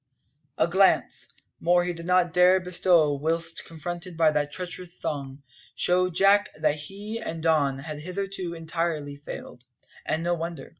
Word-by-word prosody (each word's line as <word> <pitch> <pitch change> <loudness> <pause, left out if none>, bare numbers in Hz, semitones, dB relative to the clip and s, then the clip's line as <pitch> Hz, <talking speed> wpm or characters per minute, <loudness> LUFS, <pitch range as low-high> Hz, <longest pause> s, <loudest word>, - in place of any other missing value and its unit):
A - - +3
glance 190 +2 +2 0.3
more 175 +1 +3
he 175 0 -2
did 170 0 -8
not 180 -1 +3
dare 180 +1 +6
bestow 175 -4 +3
whilst 165 +3 -1
confronted 175 +2 -6
by 160 -2 +4
that 150 -1 -1
treacherous 180 +1 -6
throng 140 -3 -5 0.3
showed 180 -1 +2
Jack 200 +2 +4
what 155 -1 +2
he 200 +9 -6
and 165 -7 -5
Don 145 -5 +2
had 150 +2 -7
hitherto 185 +1 -4
entirely 165 -3 -3
failed 135 -3 -9 0.4
(and 160 - -1
no 175 +1 +1
wonder!) 170 0 -5
170 Hz, 150 wpm, -26 LUFS, 155-180 Hz, 0.4 s, dare